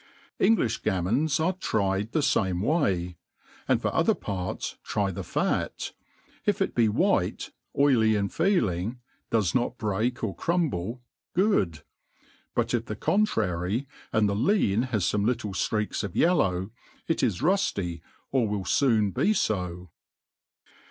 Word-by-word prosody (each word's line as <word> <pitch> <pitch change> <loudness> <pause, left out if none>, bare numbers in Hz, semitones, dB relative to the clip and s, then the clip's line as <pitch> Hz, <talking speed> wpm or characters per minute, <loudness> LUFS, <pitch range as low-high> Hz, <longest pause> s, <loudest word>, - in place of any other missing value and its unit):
£ngti(b 115 - +2
gaqnmons 110 - +1
are 170 +4 +2
tried 105 - -1
the 155 - +1
fame 95 -8 +1
way 100 - +1 0.3
$ - - -29
and - - +2
for - - 0
other - - +3
parts 95 -2 -4
try 100 -2 -1
the 85 - -5
fat - - -1
$ - - -5 0.5
if - - +1
it - - 0
be 115 -2 +3
white, 105 - +1 0.3
oily 120 -6 +4
in 100 -1 +1
feeling, 115 - 0 0.3
does 105 -7 +1
not 120 0 0
break 110 +4 -1
or 100 -6 -2
crumble, 125 - -1 0.3
good 180 - +3
j 75 - -13 0.7
but - - 0
if - - 0
the - - -5
contrary, 110 - 0 0.2
and 110 -1 +3
the 100 - 0
lean 115 - +2
has 110 -6 0
fome 105 -1 +1
little 115 -2 0
ftreai^ 105 +3 -1
of 100 -3 -5
yellow, 100 - +2 0.4
it 165 - 0
is 115 -5 0
rufly, 100 - 0 0.3
or 130 -4 +2
will 100 -2 -2
foon 110 -7 +3
be 210 - +2
fo. 90 - -2
110 Hz, 145 wpm, -27 LUFS, 95-135 Hz, 0.7 s, oily